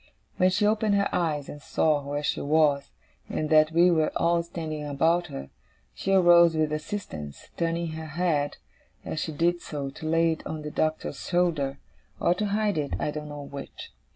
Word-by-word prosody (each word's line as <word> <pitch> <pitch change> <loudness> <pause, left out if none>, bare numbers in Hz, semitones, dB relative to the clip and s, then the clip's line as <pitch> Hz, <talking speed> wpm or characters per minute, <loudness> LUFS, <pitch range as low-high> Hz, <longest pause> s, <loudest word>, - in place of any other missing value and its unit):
When 185 - +4
she 195 +3 +1
opened 215 -1 +2
her 200 0 +2
eyes, 150 -5 0
and 145 - -9
saw 155 0 +1
where 145 +1 -3
she - - -1
was, 145 -1 +2 0.4
and 155 0 -2
that 155 0 +6
we 175 +2 +5
were 160 -2 +2
all 170 0 +2
standing 160 -3 -5
about 160 +5 +1
her, 70 - -8 0.4
she 195 - -3
arose 175 -3 +6
with 155 -1 +1
assistance: 150 - -6
turning 170 0 -1
her 160 0 -6
head, 150 -2 0 0.5
as 155 - -3
she 160 - -3
did 170 +3 +1
so, 140 -2 -5
to 155 +3 -6
lay 165 0 +3
it 160 - -5
on 155 -1 -5
the 150 - -5
Doctor's 155 +1 -1
shoulder 160 -6 0 0.4
or 175 - +3
to 205 +3 -2
hide 205 -3 0
it, 145 -2 -2
I 150 - -1
don't 150 0 -6
know 145 -1 -7
which. 140 0 -9
160 Hz, 185 wpm, -27 LUFS, 150-175 Hz, 0.5 s, that